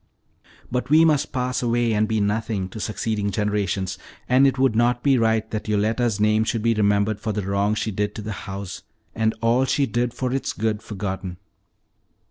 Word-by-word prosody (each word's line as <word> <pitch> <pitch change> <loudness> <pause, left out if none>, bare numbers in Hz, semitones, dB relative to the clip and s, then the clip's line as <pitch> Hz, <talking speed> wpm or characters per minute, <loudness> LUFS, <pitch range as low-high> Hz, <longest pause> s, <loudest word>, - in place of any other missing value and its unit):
"But 125 +1 -2
we 160 +2 +6
must 150 -3 +2
pass 125 -1 -1
away 120 -1 +1
and 105 0 +2
be 110 0 0
nothing 105 -2 -1
to 110 - -8
succeeding 105 -1 -2
generations, 100 -2 -1 0.3
and 130 +2 +5
it 130 -1 0
would 130 -4 +2
not 120 +1 +2
be 140 -2 +4
right 110 -1 +2
that 110 -1 -4
Yoletta's 110 +1 +1
name 110 +1 +3
should 110 -1 -2
be 115 0 +3
remembered 105 0 +1
for 110 - -2
the 105 0 -2
wrong 100 +2 0
she 110 - -2
did 105 +1 -2
to 110 - -6
the 110 - -4 0.2
house, 95 -1 -6 0.3
and 110 0 0
all 115 +3 +3
she 140 +2 +1
did 120 -1 -1
for 125 +1 -3
its 135 - -2
good 110 -1 -1
forgotten." 95 -3 -5
110 Hz, 190 wpm, -23 LUFS, 105-120 Hz, 0.3 s, we